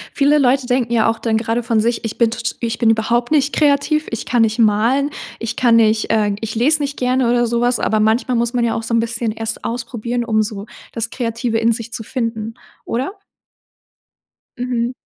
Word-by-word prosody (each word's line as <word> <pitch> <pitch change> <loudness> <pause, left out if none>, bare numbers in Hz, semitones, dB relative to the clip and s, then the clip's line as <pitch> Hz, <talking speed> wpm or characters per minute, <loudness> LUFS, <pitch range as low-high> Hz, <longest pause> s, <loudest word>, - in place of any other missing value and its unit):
Viele 290 +1 +4
Leute 265 -1 +2
denken 245 -2 0
ja 225 -1 +3
auch 225 - 0
dann 225 -2 0
grade 230 +1 -1
von 230 -1 +1
sich: 230 +1 -1
„Ich 225 - -5
bin 235 -2 +3
t 230 - -6
t 240 - -2
ich 235 -1 -2
bin 230 - +3
überhaupt 235 +2 +1
nicht 290 -2 +2
kreativ, 300 +1 +2
ich 230 - -5
kann 240 -2 +2
nicht 225 +1 +1
malen, 230 +7 +2 0.3
ich 230 +1 -4
kann 235 -2 +4
nicht, 220 -1 +2
äh 210 -2 +2
ich 225 -1 -4
lese 290 +7 +3
nicht 280 0 -3
gerne 250 0 +1
oder 240 0 +2
so 235 +1 0
was.“ 245 0 +2
Aber 215 - +1
manchmal 230 +3 +1
muss 235 0 0
man 245 -2 +1
ja 230 - 0
auch 225 - -3
so 230 +1 -3
'n 230 - +4
bisschen 230 0 -2
erst 225 0 -5
ausprobieren, 240 0 -3
um 220 -2 +1
so 210 -1 -5 0.3
das 230 0 -3
Kreative 230 -1 -2
in 230 +1 +3
sich 230 0 -6
zu 225 - -4
finden, 225 -2 -4 0.3
oder? 260 +10 -2 1.5
Mhm. 245 -1 -1
235 Hz, 215 wpm, -18 LUFS, 225-245 Hz, 1.5 s, Viele